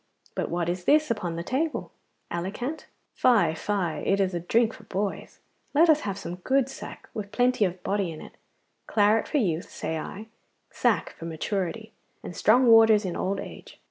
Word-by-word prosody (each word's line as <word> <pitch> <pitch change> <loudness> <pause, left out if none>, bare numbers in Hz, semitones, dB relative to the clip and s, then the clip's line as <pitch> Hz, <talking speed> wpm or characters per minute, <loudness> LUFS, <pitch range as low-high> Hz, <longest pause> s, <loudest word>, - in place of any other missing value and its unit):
'But - - -2
what 170 -1 -1
is 180 +1 -3
this 305 -2 +4
upon 180 -7 -2
the 170 - -4
table? 295 - -2 0.4
Alicant? 210 - -4 0.3
Fie, 210 -10 +3
fie, 175 -3 -2
it 195 - +2
is 190 -1 +1
a 175 - -1
drink 225 +6 +2
for 220 - -14
boys. 200 0 -4 0.3
Let 325 +2 +7
us 305 - +3
have 200 -8 -4
some 180 -3 -6
good 265 +7 +1
sack - - -9
with 205 -2 -6
plenty 245 -3 +2
of 180 0 -4
body 200 -3 -1
in 155 - -8
it. - - -11 0.5
Claret 215 +1 +3
for 300 - 0
youth, 175 - 0
say 160 0 -4
I, 200 +7 -7 0.5
sack - - +1
for 165 - -10
maturity, 190 +6 -3 0.3
and 175 - -7
strong 245 +5 +4
waters 225 -2 +6
in 180 - -3
old 195 +1 -1
age. - - -10
200 Hz, 180 wpm, -26 LUFS, 175-230 Hz, 0.5 s, Let